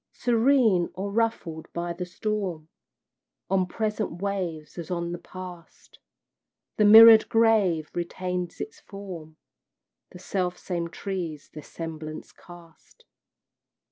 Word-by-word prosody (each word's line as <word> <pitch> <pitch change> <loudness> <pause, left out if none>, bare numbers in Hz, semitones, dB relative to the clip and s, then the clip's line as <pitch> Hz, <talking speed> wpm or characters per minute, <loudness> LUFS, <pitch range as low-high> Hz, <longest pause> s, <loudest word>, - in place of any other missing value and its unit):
Serene, 235 -6 +3
or 195 +2 -4
ruffled 200 -8 -2
by 170 0 -3
the 180 +1 -6
storm, 185 -5 -3 0.8
On 190 -1 +2
present 210 -3 -3
waves 175 -6 -4
as 165 - -7
on 170 -1 -2
the 175 - -5
past, 180 -2 -12 0.8
The 210 - +4
mirrored 220 +1 +9
grave 210 -9 +2
retains 180 0 -4
its 220 - -7
form, 175 -6 -10 0.7
The - - -12
self 180 -1 -2
same 170 -2 -3
trees 170 -3 -6
their 150 - -8
semblance 155 -1 -8
cast. 175 -2 -17
180 Hz, 110 wpm, -26 LUFS, 170-205 Hz, 0.8 s, mirrored